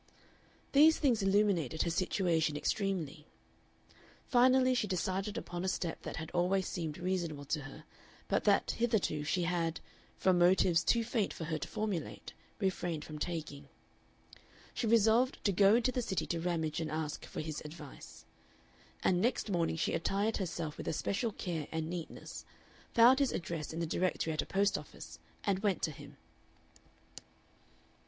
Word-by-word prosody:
These 310 +3 +7
things 250 -7 +2
illuminated 195 -7 +2
her 170 - -1
situation 165 -4 +1
extremely. 165 -4 -2 1.0
Finally 255 0 +4
she 240 -4 0
decided 190 +3 -2
upon 175 -5 -5
a - - -1
step 175 -3 -2
that - - -6
had 160 -1 -6
always 185 +2 +1
seemed 160 -4 -4
reasonable 170 -5 -2
to 150 +2 -1
her, 140 +2 -10 0.4
but - - +1
that - - +3
hitherto 220 -10 0
she 175 +4 0
had, 170 -2 -1 0.4
from 185 -2 +3
motives 175 -1 +4
too 235 -1 +3
faint 225 -3 0
for - - -6
her 160 0 -2
to - - -5
formulate, 205 -7 -4 0.2
refrained 175 -5 -2
from 155 -1 -8
taking. 150 -4 -5 1.0
She 235 - -2
resolved 230 +3 +4
to 200 - +4
go 200 +3 +5
into 245 +2 +2
the 250 - -1
City 195 -6 -2
to 170 - -2
Ramage 165 -3 -1
and 160 -2 -2
ask 155 -1 -3
for - - -5
his 155 -1 -5
advice. 150 -2 -11 0.8
And 180 -1 +3
next 235 -2 0
morning 170 -3 +1
she 160 - -1
attired 200 +6 0
herself 170 -5 -4
with - - -6
especial 205 +8 -1
care 165 -6 -4
and 160 -1 -2
neatness, 175 -3 -7 0.5
found 245 +3 +7
his 275 -2 +2
address 165 -3 -4
in 160 - -5
the 170 - 0
Directory 165 -1 0
at 155 - 0
a - - -8
post 200 +1 +2
office, - - -11 0.2
and 195 -3 +1
went 200 -3 0
to 160 - +1
him. 145 0 -12
180 Hz, 160 wpm, -33 LUFS, 160-205 Hz, 1.0 s, These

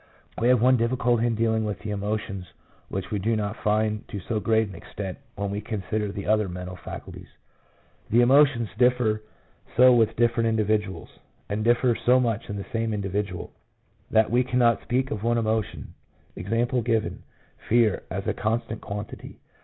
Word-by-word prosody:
We 120 - +3
have 125 -1 +5
one 130 +2 +5
difficulty 120 0 +1
in 115 - 0
dealing 110 0 +1
with 105 -3 -2
the 110 - -4
emotions 100 -3 -4 0.4
which 95 +2 -4
we 105 - 0
do 110 +4 +1
not 105 0 -2
find 105 0 0
to 100 - -5
so 110 +4 -2
great 110 0 +2
an 100 - -10
extent 95 -2 -7 0.2
when 100 0 -3
we 100 +1 -3
consider 105 -1 -3
the 100 0 -6
other 105 -2 +2
mental 90 +1 -6
faculties. 90 - -9 0.8
The 120 +3 +5
emotions 130 -3 +4
differ 125 -4 +3 0.6
so 125 +1 +8
with 115 -2 +3
different 115 -1 +2
individuals, 105 -5 -1 0.3
and 105 +1 -1
differ 120 +1 +3
so 125 +3 +3
much 115 -4 -1
in 100 - -3
the 100 - -5
same 115 -1 0
indi 100 -1 -3
vidual, 100 -2 -3 0.6
that 110 0 +3
we 125 +2 +4
cannot 120 -3 +2
speak 130 +2 -1
of 105 - -3
one 120 +1 +1
emotion 110 -2 -2 0.2
— - - -35
e.g., 115 +2 0 0.7
fear, 115 -3 +3
as - - -4
a - - 0
constant 115 0 -2
quantity. 100 0 -7
110 Hz, 170 wpm, -25 LUFS, 105-120 Hz, 0.8 s, so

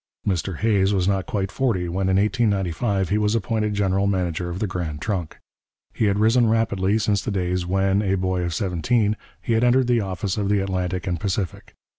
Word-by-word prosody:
Mr 90 -2 -1
Hays 100 -2 +2
was 90 -1 +1
not 95 -2 0
quite 100 -2 -2
forty 110 -10 0
when, 95 +2 -1
in 95 - +3
1895, 100 -2 0
he 105 - +1
was 105 +1 +1
appointed 105 -1 -1
general 100 -1 +1
manager 90 -3 -1
of 85 - -4
the 110 - -1
Grand 85 -6 -4
Trunk. 90 -3 -3 0.6
He 110 - 0
had 100 -1 +2
risen 115 +2 +4
rapidly 110 -3 +1
since 105 -2 +1
the - - -4
days 90 -2 -1
when, 95 +2 +2
a 95 -2 +1
boy 95 -1 -1
of 85 -2 -2
seventeen, 105 +5 +1 0.3
he 120 - 0
had 115 +1 +2
entered 125 +1 +4
the 120 -1 +2
office 95 0 -3
of 100 -1 -1
the 105 0 +3
Atlantic 95 -2 -2
and 90 -2 -2
Pacific. 95 -1 -3
95 Hz, 200 wpm, -23 LUFS, 90-105 Hz, 0.6 s, risen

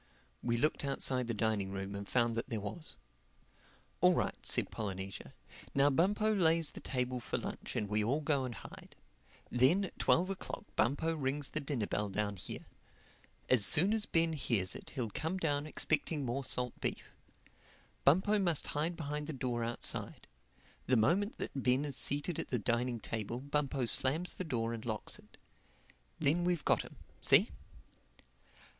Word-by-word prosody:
We 120 -1 0
looked 150 +5 +1
outside 130 -2 -1
the 115 - -1
dining 105 -3 0
room 95 0 -4
and 100 0 -6
found 120 -2 +3
that 115 +3 -3
there 115 -4 -2
was. 105 +11 -4 1.1
"All - - +6
right," - - +1
said - - +1
Polynesia. 95 -3 -5 0.4
"Now 140 +1 +5
Bumpo 205 +8 +3
lays 165 -5 +3
the - - -9
table 125 -1 -2
for 120 - -3
lunch - - -6
and 105 - 0
we 105 +1 +1
all 130 +8 +1
go 145 -3 +1
and 125 -3 -4
hide. - - -11 0.6
Then 130 +11 +4
at - - -10
twelve 185 +3 +3
o'clock 195 - -5
Bumpo 145 +8 +2
rings 140 -1 -1
the 155 - -1
dinner 135 -6 -1
bell 105 0 -1
down 100 +1 -1
here. - - -5 0.8
As 125 -5 +5
soon 180 - +6
as 220 -1 0
Ben 165 -1 +2
hears 115 -10 +1
it - - -8
he'll 120 -6 -2
come 160 - -2
down 150 -4 0
expecting 155 -1 0
more 130 +3 -2
salt 125 -1 +1
beef. - - -3 0.9
Bumpo 190 +9 +4
must 170 -6 +1
hide 165 +4 -1
behind 150 -2 -3
the 160 - -3
door 125 -3 -2
outside. 120 +1 -3 0.6
The 130 - +4
moment 180 - +2
that - - -4
Ben 130 +3 +2
is 140 -2 -3
seated 145 +6 -1
at - - -3
the 125 - 0
dining 120 +3 0
table 115 +2 -4
Bumpo 140 -1 -1
slams 150 +9 0
the - - -4
door 115 -8 -1
and 115 -1 -5
locks 110 -3 -3
it. - - -19 0.8
Then 160 +3 +3
we've 175 -3 0
got - - +4
him. - - -11 0.2
See?" - - +5
135 Hz, 170 wpm, -34 LUFS, 115-160 Hz, 1.1 s, All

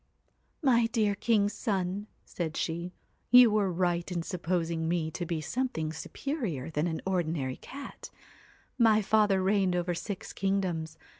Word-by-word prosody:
'My 240 -4 +4
dear 220 -3 +1
king's 205 -1 +2
son,' 200 -1 -2 0.2
said 160 -3 -4
she, 170 +2 -2 0.4
'you 245 -1 +8
were 205 -3 +2
right 175 0 0
in 170 -2 -2
supposing 170 -2 -1
me 165 -2 0
to 175 +1 -4
be 160 -2 -2
something 160 -4 -2
superior 180 - -4
to 150 - -3
an 160 +1 -1
ordinary 160 -8 -1
cat. 275 0 -9 0.7
My 220 -2 +5
father 205 -2 +3
reigned 190 -2 +2
over 175 0 0
six 195 +3 -5
kingdoms. 185 -5 -1
185 Hz, 140 wpm, -29 LUFS, 165-210 Hz, 0.7 s, you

